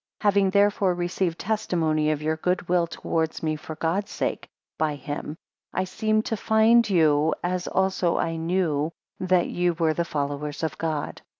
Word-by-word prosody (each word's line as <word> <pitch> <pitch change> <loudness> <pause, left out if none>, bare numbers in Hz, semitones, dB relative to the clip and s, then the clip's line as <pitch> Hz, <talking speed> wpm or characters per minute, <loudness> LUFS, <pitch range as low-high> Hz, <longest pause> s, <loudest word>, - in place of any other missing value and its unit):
4 210 - +4
Having 195 -1 +3
therefore 200 -1 +3
received 175 -1 -1
testimony 165 -7 0
of 150 -1 -1
your 155 +1 +1
good 180 +2 -1
will 175 -1 +2
towards 160 -1 -2
me 155 -1 0
for 155 +1 -8
God's 170 +6 -1
sake, - - -3 0.3
by 155 -2 +1
him; 145 +2 -6 0.4
I 185 - 0
seemed 215 +3 0
to 225 - -2
find 220 +2 +4
you, 155 -4 +3
as 180 0 -1
also 190 -2 +1
I 165 - -1
knew 165 -3 0 0.3
that 185 -1 +2
ye 175 0 +1
were 165 -2 +1
the 170 - 0
followers 145 -1 -3
of 160 - -1
God. 155 -3 -3
170 Hz, 170 wpm, -25 LUFS, 155-190 Hz, 0.4 s, 4